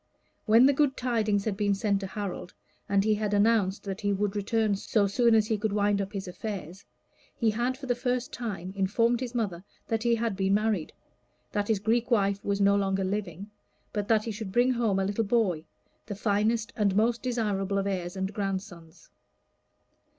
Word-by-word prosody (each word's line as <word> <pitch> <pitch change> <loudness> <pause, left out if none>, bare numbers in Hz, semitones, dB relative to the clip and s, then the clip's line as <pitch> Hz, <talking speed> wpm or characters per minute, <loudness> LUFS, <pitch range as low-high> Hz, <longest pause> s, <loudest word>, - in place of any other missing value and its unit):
When 225 +4 +7
the 280 - +5
good 275 -1 +1
tidings 220 -5 0
had 215 -3 -1
been 205 0 +1
sent 200 0 0
to 195 - -5
Harold, 195 -2 -6 0.3
and 200 0 +3
he 215 +1 +3
had 210 -1 -1
announced 205 -2 +2
that 195 0 -5
he 205 -1 +1
would 200 +1 -1
return 210 +1 +1
so 200 +1 +1
soon 230 +3 +3
as 215 -1 +4
he 215 -1 -1
could 215 0 -1
wind 205 -1 +2
up 195 0 -4
his 195 -3 -5
affairs, 185 -1 -6 0.5
he 225 -2 +1
had 240 +4 -1
for 275 - -8
the 250 - +1
first 245 0 -2
time 195 -6 -5
informed 230 +5 +2
his 250 -1 -5
mother 190 -7 -2 0.3
that 225 -1 0
he 235 0 +2
had 230 -3 -1
been 195 +1 +2
married, 210 -6 0 0.6
that 205 -1 -1
his 220 - +2
Greek 225 +4 0
wife 200 -4 +1
was 200 0 -1
no 200 0 +4
longer 195 -1 0
living, 195 0 -4 0.4
but 205 -1 -2
that 220 -1 +3
he 225 - -4
should 210 -2 -6
bring 245 +5 +3
home 230 -5 +1
a 195 - +1
little 205 +3 0
boy, 200 -8 +1 0.4
the 205 - -4
finest 215 +2 0
and 200 -3 +1
most 230 +3 +2
desirable 205 -6 -1
of 195 - 0
heirs 180 -2 -3
and 190 +1 -3
grandsons. 185 -5 -5
205 Hz, 195 wpm, -28 LUFS, 195-225 Hz, 0.6 s, When